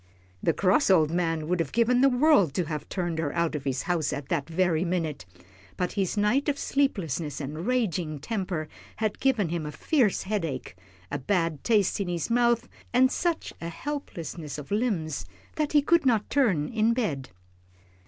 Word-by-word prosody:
The - - +3
cross 200 +9 +2
old 160 -5 +5
man 165 -3 0
would 180 +1 0
have 165 - -1
given 235 +2 +3
the 275 - +6
world 245 - +4
to 180 - +1
have 150 -1 -5
turned 175 -4 -2
her 150 -3 -1
out 170 -1 +1
of 145 -2 -4
his 135 -1 -1
house 170 -5 0
at 140 -2 -5
that 160 -3 -1
very 170 -1 +1
minute, 165 - -2 0.5
but 180 - -1
his 195 0 -1
night 240 +9 +2
of 285 - 0
sleeplessness 170 - -1
and 155 +6 -5
raging 185 -11 0
temper 180 -1 -3 0.3
had 215 -1 -2
given 240 -10 +2
him 170 -1 -2
a 150 - -5
fierce 245 - +1
headache, 165 - -3 0.4
a 145 - -2
bad 165 0 0
taste 210 -5 +2
in 200 - -1
his 175 +4 -2
mouth, 240 0 +3 0.2
and 255 +1 +4
such 340 +1 -1
a 170 - -4
helplessness 170 - -5
of 150 +3 -9
limbs 200 - -1 0.3
that 300 -1 0
he 295 -1 +5
could 340 +2 +4
not 225 -6 +1
turn 200 - +2
in 225 0 +2
bed. 150 - -2
180 Hz, 180 wpm, -27 LUFS, 155-235 Hz, 0.5 s, the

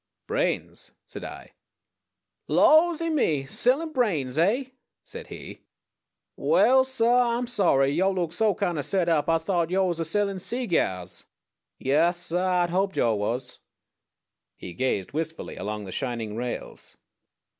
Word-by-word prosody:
"Brains," - - -2
said - - -9
I. - - -9 1.0
"Lawsy 330 +1 +4
me! 155 - +1
Sellin' 270 - 0
brains, 165 - 0
eh?" 230 - +1 0.3
said - - -9
he. - - -10 0.7
"Waal, 265 - +4
suh, 240 -1 +2
Ah'm 245 - -2
sorry. 180 - +2
Yo' 185 +6 +2
look 175 -4 -2
so 210 +1 +2
kind 170 -3 -1
o' - - +1
set 185 +3 0
up 155 -3 +2
Ah 165 - +4
thought 170 0 -1
yo' 190 +1 +2
was 175 -2 -1
a - - 0
sellin' 200 +4 -1
seegyars. 160 - -2 0.5
Yaas, 155 +6 +2
suh 175 0 -2 0.2
Ah'd 175 - -2
hoped 190 +2 0
yo' 115 -2 +3
was." 120 +5 -3 1.0
He 90 - -9
gazed 125 -5 -1
wistfully 160 +2 -4
along 105 0 -5
the 95 - -8
shining 115 -3 -3
rails. 120 +1 -5
175 Hz, 140 wpm, -26 LUFS, -, 1.0 s, Lawsy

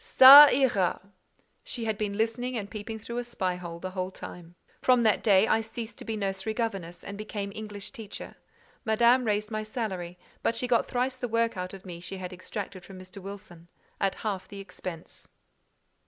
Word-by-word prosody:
"Ca 280 +3 +13
ira." 245 -9 +2 0.6
She 235 -2 -5
had 220 -1 0
been 205 -1 -3
listening 235 +3 -1
and 205 -2 -5
peeping 220 +1 -6
through 235 +2 -5
a - - -3
spy 195 -6 -2
hole 170 -2 -7
the 185 +2 -5
whole 185 -1 -3
time. 175 -2 -10 0.3
From 250 -2 +4
that 220 -2 +3
day 200 -1 +5
I 225 - +3
ceased 225 +1 -7
to - - -9
be 220 -1 -3
nursery 195 +1 -2
governess, 195 -8 -3
and 200 +1 -8
became 205 -2 -5
English 210 -2 -7
teacher. 225 -6 -8 0.5
Madame 235 +3 +4
raised 210 0 -1
my 215 -1 -2
salary; 195 -6 -4 0.2
but 230 - 0
she 250 - -1
got 240 -1 +2
thrice 255 +1 -1
the 250 - -3
work 230 0 +1
out 185 +1 -5
of 190 - -14
me 175 -2 -8
she 185 +2 -6
had 185 0 -6
extracted 185 0 -6
from 190 0 -11
Mr. 185 +2 -11
Wilson, 195 -3 -10 0.3
at 195 -1 0
half 195 -3 -2
the 200 - -9
expense. 180 -3 -8
210 Hz, 190 wpm, -28 LUFS, 185-230 Hz, 0.6 s, Ca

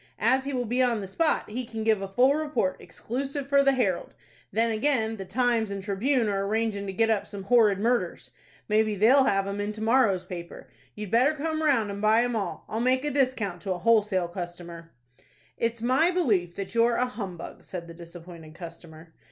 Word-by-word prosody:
As 260 +5 +2
he 280 - -3
will 250 -1 -1
be 245 +3 0
on 240 -3 +2
the 195 - -6
spot, 315 - 0
he 240 +4 -4
can 225 -2 -6
give 220 -2 +2
a 195 - -3
full 250 +8 +3
report, 295 -11 -1
exclusive 275 +3 -5
for 280 0 +4
the 275 0 +3
'Herald'! 205 -9 -1 0.4
Then 225 +3 +1
again, 225 -1 0
the 195 - -6
'Times' 230 +2 0
and 200 -1 -5
'Tribune' 225 +5 0
are 195 -1 -1
arrangin' 210 -1 -1
to - - -3
get 225 +3 +1
up 210 -3 0
some 200 -2 -8
'horrid 210 -2 +4
murders.' 240 +3 -1 0.4
Maybe 215 0 +2
they'll 250 +7 +5
have 195 -4 +1
'em 200 +1 -3
in 205 +1 -2
to 215 - -9
morrow's 225 -6 +3
paper. 170 -2 -9 0.2
You'd 210 -2 -7
better 255 +7 +3
come 315 +1 -2
round, 260 -9 +2
and 200 0 -6
buy 220 +2 +4
'em 245 -1 -1
all. 205 -3 -4
I'll 220 - -3
make 255 +3 +1
a 295 - -1
discount 250 -10 0
to 195 -2 -2
a - - -5
wholesale 210 -3 +2
customer." 175 -1 -8 0.6
"It's 230 0 -2
my 260 +8 +3
belief 210 - 0
that 195 -1 -6
you're 235 0 +3
a 250 - +2
humbug," 200 -8 -7
said 175 -2 -7
the 170 - -10
disappointed 170 -1 -12
customer. 165 -2 -11
220 Hz, 205 wpm, -26 LUFS, 195-250 Hz, 0.6 s, they'll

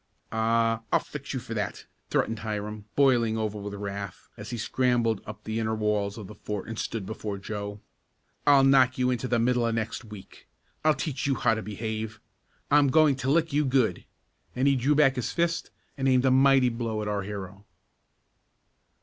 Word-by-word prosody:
"I 115 0 +2
I'll - - +5
fix 145 -1 -7
you 130 - -2
for 115 -1 -7
that!" 105 -3 -3 0.2
threatened 115 0 0
Hiram, 105 -1 -4
boiling 120 -5 +3
over 110 -1 -2
with 100 0 -6
wrath, 100 -1 -6
as 105 -1 -9
he 120 - -4
scrambled 120 -1 +1
up 105 - -8
the 110 +1 -3
inner 110 0 0
walls 105 -1 -1
of 110 - -7
the 105 - -10
fort 105 -2 -5
and 115 -1 -5
stood 110 -4 -3
before 105 0 -5
Joe. 100 +1 -6 0.7
"I'll 140 -2 +7
knock 130 -2 +5
you 125 0 +2
into 125 0 -2
the 120 0 +1
middle 120 +1 +2
of 115 -1 0
next 115 +1 -3
week! 105 -4 -12 0.4
I'll 155 -1 +4
teach 140 -2 -3
you 135 - +2
how 115 - +2
to 110 - -2
behave. 110 +1 -5 0.5
I'm 145 0 +6
going 155 0 +5
to 135 0 -2
lick 160 +1 +2
you 150 +1 +3
good," 130 -4 +1 0.5
and 130 +2 +2
he 140 - +4
drew 135 +4 +2
back 135 -3 +4
his 125 - -2
fist, 170 0 0 0.3
and 135 - +1
aimed 130 0 +3
a 130 - +4
mighty 135 -1 +5
blow 115 -2 -3
at - - -4
our 105 -1 -1
hero. 100 0 -7
115 Hz, 190 wpm, -27 LUFS, 105-130 Hz, 0.7 s, I'll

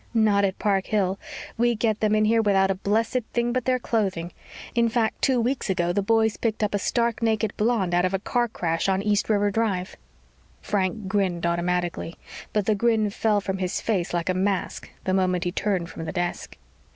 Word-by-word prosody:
"Not 210 -3 +4
at 195 -1 0
Park 195 -2 0
Hill. 195 -2 0 0.4
We 240 0 +3
get 215 -1 0
them 215 0 +2
in 215 0 +3
here 225 +1 +3
without 195 -2 +3
a - - +2
blessed 215 +6 0
thing 240 0 0
but 255 -1 -1
their 255 -1 +2
clothing. 195 -8 -1 0.4
In 235 -1 +3
fact, 225 -1 0
two 260 -2 +3
weeks 245 0 -1
ago 175 -2 +1
the 200 - +1
boys 220 +1 +2
picked 220 -2 -1
up 210 - 0
a 205 - +1
stark 235 +2 0
naked 220 -2 0
blonde 210 -5 +1
out 175 0 +3
of 185 +1 +1
a - - +2
car 240 +5 0
crash 170 -4 -1
on 190 +1 +1
East 210 0 +1
River 205 -1 +2
Drive." 195 -4 -1 0.6
Frank 200 +1 -1
grinned 190 -4 0
automatically, 175 0 -1 0.4
but 210 -2 0
the 215 - +3
grin 215 -1 +1
fell 210 0 +1
from 190 -1 -3
his 185 0 -1
face 190 -6 -1
like 170 -1 -2
a - - +3
mask 190 +1 -2
the 185 - 0
moment 185 -2 +1
he 175 - -1
turned 185 -2 -1
from 165 -1 -7
the - - -3
desk. 175 -1 -3
205 Hz, 205 wpm, -25 LUFS, 185-225 Hz, 0.6 s, Not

